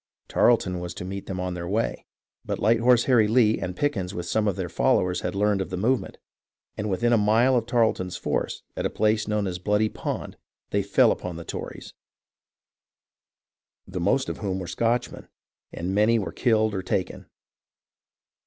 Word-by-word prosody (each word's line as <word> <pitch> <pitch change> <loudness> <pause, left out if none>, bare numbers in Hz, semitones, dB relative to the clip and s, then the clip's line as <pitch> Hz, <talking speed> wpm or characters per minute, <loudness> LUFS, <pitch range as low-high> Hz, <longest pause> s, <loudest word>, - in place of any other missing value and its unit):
Tarleton 95 -7 +2
was 85 0 -6
to - - -6
meet 100 +1 -6
them 95 -1 -4
on 90 0 -2
their 85 -1 -5
way, 110 +5 -2 0.4
but - - -3
Light 115 +2 +3
Horse 120 0 +4
Harry 120 -5 +4
Lee 110 -1 +3
and 90 0 -4
Pickens 100 -10 -1
with 85 - -4
some 105 +4 0
of 100 - +1
their - - -3
followers 90 -1 +1
had 90 +1 -3
learned 105 0 +2
of 95 - -4
the 90 - -4
movement, 120 +6 0 0.6
and 105 0 -3
within 120 +5 +1
a 115 - +4
mile 115 +5 +4
of 120 -2 0
Tarleton's 110 -7 +1
force, - - -2
at - - -3
a - - +1
place 110 0 +1
known 105 -1 0
as 90 -1 -3
Bloody 105 +3 +1
Pond, - - -5 0.3
they - - +2
fell - - +4
upon 90 -2 -4
the 85 0 -8
Tories, - - -7 1.9
the 95 -1 -6
most 130 +10 +1
of - - -4
whom 95 -3 -2
were 95 - -5
Scotchmen, 115 +7 -1 0.4
and 90 +3 -4
many 105 +3 +4
were 105 - -3
killed 110 -3 +2
or 95 - -2
taken. 95 0 -3
105 Hz, 180 wpm, -25 LUFS, 90-115 Hz, 1.9 s, Horse